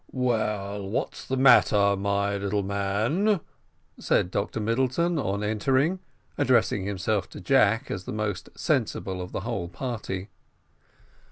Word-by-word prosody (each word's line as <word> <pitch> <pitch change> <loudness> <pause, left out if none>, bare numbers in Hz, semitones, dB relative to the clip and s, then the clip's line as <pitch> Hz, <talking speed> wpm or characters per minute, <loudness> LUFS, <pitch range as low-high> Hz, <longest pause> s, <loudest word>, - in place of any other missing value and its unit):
"Well, 105 -5 -1
what's 105 - -3
the 130 - -1
matter, 105 -6 +5
my 100 +1 0
little 100 0 -1
man?" 110 - +1 0.6
said 90 - +1
Dr 100 +3 -2
Middleton, 130 +10 +1
on 100 -5 -1
entering, 130 - +1 0.4
addressing 120 -7 +2
himself 100 +1 -1
to - - -10
Jack, 125 -1 +2
as 90 - -4
the - - -5
most 105 -5 -3
sensible 95 -1 -1
of 90 - -7
the - - -3
whole 100 -5 -3
party. 105 -2 -5
105 Hz, 125 wpm, -26 LUFS, 100-125 Hz, 0.6 s, matter